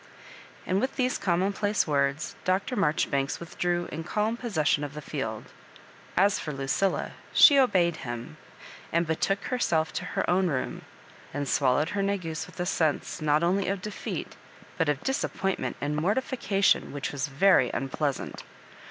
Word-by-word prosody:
And 190 +2 +1
with 260 - -1
these 255 0 0
commonplace 200 +3 +1
words, 140 0 0
Dr. 190 +7 0
Mar 195 -9 +3
jbribanks 140 -2 -1
withdrew 175 +1 -2
in 165 - -4
calm 215 +6 0
possession 160 - 0
of 145 0 -5
the - - -4
field. 115 -8 -4 0.7
As 195 +2 +4
for 150 - -4
Lucilla, 140 +8 0 0.2
she 285 -2 +8
obeyed 175 -10 +3
him, 120 -1 -6 0.5
and 170 +1 +2
be 160 0 0
took 195 +4 0
herself 165 -11 0
to - - -3
her - - +1
own 185 +1 +3
room, 140 -6 -2 0.5
and 145 -1 -2
swallowed 140 +3 +2
her 205 - -1
negus 185 -6 -2
with - - -15
a 175 - 0
sense, 160 -1 0
not 150 +1 +2
only 185 +3 +2
of 195 +1 -1
defeat, 210 +2 -5 0.4
but 165 -3 +1
of 145 -2 -1
disappointment 195 -7 -1
and 145 +1 -2
mortification 200 - +1
which 145 -1 -3
was 140 -1 -2
very 140 -2 +4
unpleasant. 135 +1 -2
170 Hz, 155 wpm, -27 LUFS, 145-195 Hz, 0.7 s, she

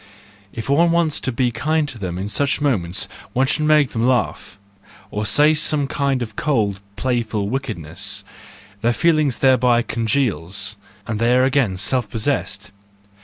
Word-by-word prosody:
If 115 - -6
one 160 +5 +4
wants 165 -2 +1
to 130 - -3
be 125 0 0
kind 155 +4 0
to 120 -5 -9
them 90 -3 -4
in 95 +2 -3
such 140 +6 +1
moments 95 -11 0 0.3
one 130 +2 +2
should 150 +3 0
make 150 -3 +4
them 115 +1 0
laugh, 125 -5 -1 0.5
or 105 0 -2
say 150 +7 +5
some 150 -2 +1
kind 135 -2 -1
of 110 -2 -9
cold, 105 -10 0 0.2
playful 115 -5 -1
wickedness 105 - -4 0.6
:—their 120 +3 +1
feeling 155 0 +2
thereby 125 -1 +3
congeals, 110 - -1 0.3
and 110 -1 -3
they 120 +2 +3
are 130 - +4
again 130 -8 +1
self 120 +5 +1
possessed. 110 -1 -2
125 Hz, 155 wpm, -20 LUFS, 110-140 Hz, 0.6 s, say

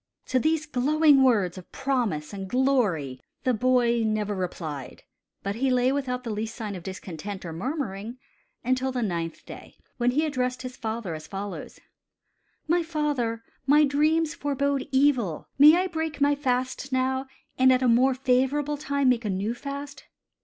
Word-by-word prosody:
To 255 - +3
these 315 +3 +1
glowing 295 +1 +4
words 200 -8 +2
of 180 - -16
promise 235 - -1
and 195 -1 -5
glory 210 - +1 0.2
the 255 -2 +2
boy 240 0 +2
never 215 -1 0
replied, 165 -7 -5 0.4
but 200 - -2
he 265 +2 +1
lay 250 0 +3
without 255 -3 -2
the 230 - -4
least 220 +2 -4
sign 215 -4 -5
of 185 - -7
discontent 190 +1 -7
or 165 - -5
murmuring 230 - -4 0.5
until 255 +1 0
the 250 -2 -1
ninth 170 -5 -3
day, - - -11 0.2
when 245 0 +2
he 300 +6 +1
addressed 255 -3 -2
his 255 0 -6
father 220 -6 -4
as 155 0 -8
follows: 200 0 -6 0.9
"My 345 +2 +3
father, 295 -8 -1 0.2
my 295 +2 +6
dreams 305 +3 +2
forbode 280 -1 -1
evil. 260 - +2
May 300 +3 +9
I 365 - +1
break 320 -4 -3
my 285 0 +4
fast 260 -1 -2
now, 260 +1 0 0.3
and 260 0 +6
at 255 0 +3
a - - +3
more 255 +3 +4
favorable 270 +3 +1
time 280 -2 +1
make 245 -1 +2
a 210 - -2
new 200 +4 -1
fast?" 280 +3 -7
255 Hz, 165 wpm, -26 LUFS, 210-280 Hz, 0.9 s, May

